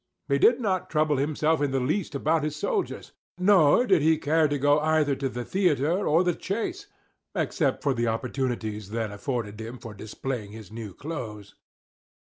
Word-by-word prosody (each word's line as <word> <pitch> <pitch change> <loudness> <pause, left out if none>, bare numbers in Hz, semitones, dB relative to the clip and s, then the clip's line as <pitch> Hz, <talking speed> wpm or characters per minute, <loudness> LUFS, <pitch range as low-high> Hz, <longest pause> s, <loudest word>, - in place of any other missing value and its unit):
He 140 0 +2
did 235 - +5
not 190 -6 -1
trouble 155 -2 +2
himself 155 +2 +1
in 145 - +2
the 135 0 0
least 150 +6 -1
about 155 +2 +1
his 150 -1 -2
soldiers; 430 - -2 0.3
nor 185 +2 +5
did 190 -8 +4
he 160 +1 +4
care 155 +1 +2
to 145 0 -1
go 145 +2 +4
either 155 -2 +2
to 135 0 -2
the 125 -1 -5
theatre 180 0 +1
or 165 +4 +4
the 175 -1 +1
chase, 340 - -4 0.5
except - - 0
for 140 - +2
the 120 -1 -1
opportunities 115 -3 -2
then 110 -1 -2
afforded 105 -1 -4
him 115 +3 -7
for 115 -3 -9
displaying 110 +1 -5
his 110 -4 -11
new 110 -4 -7
clothes. 110 -9 -7
145 Hz, 175 wpm, -26 LUFS, 115-160 Hz, 0.5 s, did